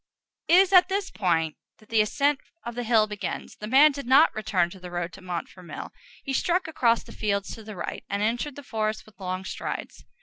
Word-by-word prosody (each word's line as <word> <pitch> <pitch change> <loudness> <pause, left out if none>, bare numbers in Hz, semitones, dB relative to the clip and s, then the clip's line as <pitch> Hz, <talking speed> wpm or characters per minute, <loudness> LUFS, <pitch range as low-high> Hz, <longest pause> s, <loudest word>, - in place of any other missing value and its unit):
It 335 - +6
is 380 +1 +5
at 365 0 +7
this 390 0 -1
point 165 -5 0 0.2
that 215 - -22
the 225 -1 +4
ascent 280 +6 +1 0.2
of 235 +1 -5
the 245 - -3
hill 225 -2 +4
begins. 210 -1 -5
The 210 - -6
man 280 +6 +7
did 280 -3 -7
not 275 +5 +6
return 185 -5 0
to 190 - -11
the 180 0 -8
road 175 0 -3
to 195 - -12
Montfermeil; 180 0 -6 0.3
he 270 - -3
struck 350 +6 +1
across 235 -7 +2
the - - -13
fields 200 -2 -2
to 225 - -9
the 215 -1 -8
right, 175 - -5
and 200 +1 -1
entered 240 +6 -1
the 285 - -9
forest 215 -3 -2
with 210 -3 -20
long 185 0 -4
strides. - - -5
215 Hz, 215 wpm, -26 LUFS, 190-275 Hz, 0.3 s, at